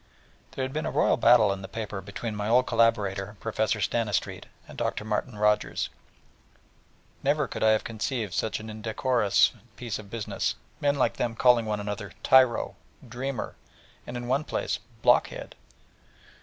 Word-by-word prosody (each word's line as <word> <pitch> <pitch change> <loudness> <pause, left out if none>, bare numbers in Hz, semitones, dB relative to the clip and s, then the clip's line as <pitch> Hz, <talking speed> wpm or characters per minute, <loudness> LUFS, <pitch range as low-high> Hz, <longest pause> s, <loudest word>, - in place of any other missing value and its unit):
There 135 - -3
had 130 - -6
been 155 - -2
a - - 0 0.3
battle 120 +1 +7
royal - - +2
in 95 - -7
the 95 - -7
paper 105 -1 -5
between 105 +3 -5
my 105 +1 -2
old 125 +2 +5
collaborator 105 -4 +1
Professor 110 0 0
Stanistreet 105 0 -1 0.2
and - - -11
Dr. 105 - -2
Martin 110 +1 -2
Rogers, 105 0 +1 1.3
and - - -31
never 145 0 +2
could - - -6
I 110 - +5
have 110 0 +3
conceived 110 -2 -3
such 110 - -1
an 110 - -9
indecorous 110 0 +2 0.2
piece 120 -4 -4
of 105 -2 -11
business, 115 0 -2 0.2
men 145 0 +2
like 120 -7 +1
them 115 -1 -1
calling 120 -2 +4
one 105 -1 -1
another 105 -3 -5
'tyro,' 130 -3 +4 0.3
'dreamer,' 125 +1 -4 0.5
and 120 - -5
in 120 0 -5
one 135 +4 +1
place - - -2 0.2
'block - - +5
head.' - - -9
110 Hz, 165 wpm, -27 LUFS, 105-125 Hz, 1.3 s, battle